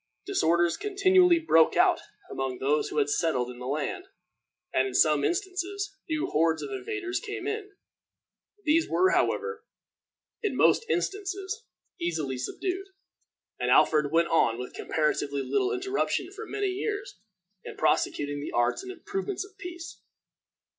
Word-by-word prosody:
Disorders 170 - +2
continually 375 -3 +4
broke 165 - +4
out - - +4 0.3
among 130 -1 -3
those 145 +4 +1
who - - -5
had 145 -1 +3
settled 145 -5 0
in 120 - -11
the 125 - -6
land, 145 +1 -3 0.7
and, 130 0 +3
in 130 - -6
some 150 -2 +4
instances, 390 +2 -2
new 310 -1 0
hordes 160 +1 +1
of - - -6
invaders 395 -2 -3
came 415 -3 -6
in. 420 -1 -4 0.9
These 320 +2 +3
were, 375 +1 +3
however, 455 +2 0 0.8
in 425 - -1
most 460 - +4
instances, 395 +4 -2 0.3
easily 155 -7 -2
subdued, 375 - -3 0.7
and - - 0
Alfred 150 -2 +4
went 170 +1 +3
on 115 -8 +3
with 125 0 -6
comparatively 145 -2 -1
little 395 - +1
interruption 385 -2 -1
for 430 +2 -8
many 405 -1 -1
years, 405 - -4 0.4
in - - -9
prosecuting 145 0 +1
the - - -6
arts 120 - +1
and 380 -1 -7
improvements 390 +1 -4
of 395 0 -18
peace. 345 -1 -8
360 Hz, 140 wpm, -28 LUFS, -, 0.9 s, continually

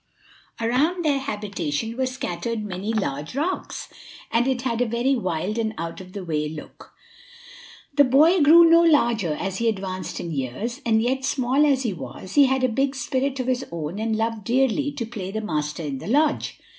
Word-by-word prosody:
Around 295 +10 +1
their 285 -2 +2
habitation 210 - -3
were 260 +1 0
scattered 230 -2 -3
many 195 +2 -4
large 150 - -3
rocks, 330 +7 -3 0.4
and 240 +2 +2
it 255 -2 0
had 240 -2 -1
a 245 - +2
very 240 +4 +1
wild 190 0 -2
and 220 -1 -1
out 165 +2 -5
of 185 0 -13
the 200 -3 -6
way 150 -2 -1
look. 155 -1 -11 1.0
The 285 0 +6
boy 305 +7 +5
grew 330 +3 +8
no 335 +1 +7
larger 235 - +3
as 190 +4 -3
he 230 0 +2
advanced 190 -3 -4
in 170 - -5
years, 155 - -4
and 220 -1 +3
yet, 260 +2 0
small 265 +2 +2
as 270 -2 +2
he 225 -5 -1
was, 160 +4 -9
he 285 -2 +6
had 265 0 0
a - - +5
big 270 +4 0
spirit 270 0 -1
of 255 - -1
his 255 0 0
own 170 +3 -4
and 220 0 0
loved 225 -1 -2
dearly 265 +5 +1
to 260 -5 -4
play 215 -5 -6
the 215 +3 -3
master 155 -6 -3
in 140 -3 -4
the - - -8
lodge. 295 +6 +1
230 Hz, 195 wpm, -24 LUFS, 185-270 Hz, 1.0 s, grew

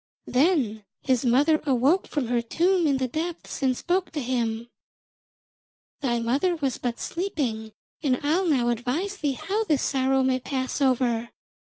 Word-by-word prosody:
Then 255 - +1 0.2
his 260 -2 +1
mother 285 +6 +3
awoke 280 +6 +2
from 290 -4 -2
her 240 -1 +2
tomb 345 +8 +2
in 280 -2 +2
the 260 -1 -1
depths 320 +5 -5
and 260 -2 +2
spoke 360 +1 0
to 305 - -2
him: 235 -3 -2 1.3
'Thy 240 -4 0
mother 275 +10 +1
was 275 -6 -2
but 240 -1 -3
sleeping, 265 - -3 0.3
and 260 -5 +1
I'll 340 +6 +2
now 255 -6 +2
advise 260 - -2
thee 290 -5 0
how 405 - -2
this 300 -8 +1
sorrow 265 -1 +2
may 260 0 +2
pass 260 +1 -3
over. 240 -3 +1
265 Hz, 155 wpm, -25 LUFS, 245-320 Hz, 1.3 s, mother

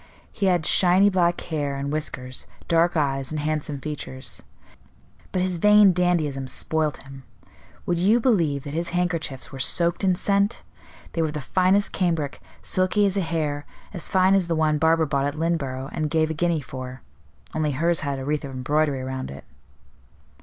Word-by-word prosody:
He 200 - -1
had 175 -4 +2
shiny 190 +4 +4
black 175 -2 +2
hair 145 -4 -3
and 140 +1 -3
whiskers, 130 -4 -4 0.2
dark 170 +1 +2
eyes 135 -3 0
and 155 - -3
handsome 150 -1 -2
features. 130 -6 -6 0.9
But 185 - 0
his 185 -1 -1
vain 210 +1 +6
dandyism 160 -7 0
spoilt 155 +3 -1
him; 135 0 -11 0.6
would 175 -1 0
you 210 +7 +4
believe 170 - +1
that 145 - -7
his 170 +2 -2
handkerchiefs 165 -7 -2
were 135 - -8
soaked 170 +7 +3
in 185 -2 +3
scent? 200 +4 +1 0.5
They 165 - 0
were 160 - +2
of 150 - -6
the - - -2
finest 185 +7 +2
cambric, 165 -6 -1 0.2
silky 185 +3 +2
as 195 -1 +1
a 200 - +1
hair, 155 -4 -2 0.3
as 175 - -4
fine 190 0 +4
as 190 -3 +2
the 165 - 0
one 155 -1 +1
Barbara 160 +1 +3
bought 140 -1 0
at 145 - -4
Lynneborough 140 -5 -2
and 155 -1 -1
gave 160 0 +1
a - - -1
guinea 165 0 0
for; 130 -1 -8 0.5
only 155 -2 0
hers 165 +4 +1
had 140 -3 -2
a 135 - -5
wreath 150 +1 -1
of 140 - -6
embroidery 140 +1 0
around 130 0 -5
it." 70 - -9
155 Hz, 180 wpm, -24 LUFS, 140-180 Hz, 0.9 s, vain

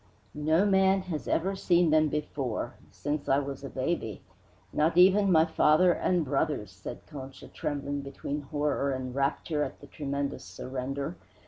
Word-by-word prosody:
"No 155 +6 +2
man 190 -1 +4
has 155 -10 -5
ever 190 +4 +1
seen 175 -3 +3
them 155 0 +5
before 145 -5 -3 0.2
since 145 0 -3
I 135 - +5
was 140 -1 -4
a 140 - -5
baby; 130 - -2 0.5
not 160 +3 +2
even 195 +2 +6
my 160 -2 +6
father 160 +2 +4
and 175 -1 +1
brothers," 135 - -1
said 95 +6 -9
Concha, 135 -3 -9
trembling 145 -1 -3
between 140 +1 -5
horror 145 -1 -1
and 130 -1 -4
rapture 140 +3 0
at - - -6
the - - -12
tremendous 140 -1 -3
surrender. 135 - -5
145 Hz, 150 wpm, -29 LUFS, 135-165 Hz, 0.5 s, even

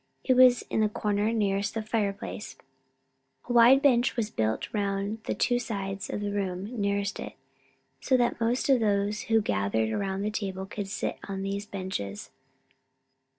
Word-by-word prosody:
It 260 - +3
was 250 -1 +6
in - - -2
the 215 -1 +3
corner 210 +1 0
nearest 200 -2 0
the 225 - -2
fireplace. 210 -2 -3 0.9
A 245 - -2
wide 245 +4 +7
bench 250 -3 +3
was 220 -2 -1
built 110 0 -1
round 200 +1 -2
the - - -1
two 245 0 +1
sides 195 -4 -4
of - - -3
the 205 0 -2
room 190 -2 -2 0.2
nearest 200 0 -1
it, - - -6 0.7
so 260 - +2
that 240 -1 0
most 235 +3 +1
of 270 -3 +5
those 205 -1 +1
who 225 -1 +4
gathered 100 - 0
around 195 - -2
the 210 - -1
table 190 -3 -4
could 205 0 -5
sit 195 - -3
on 195 -1 -4
these 200 +1 -3
benches. 185 - -5
205 Hz, 165 wpm, -28 LUFS, 195-225 Hz, 0.9 s, wide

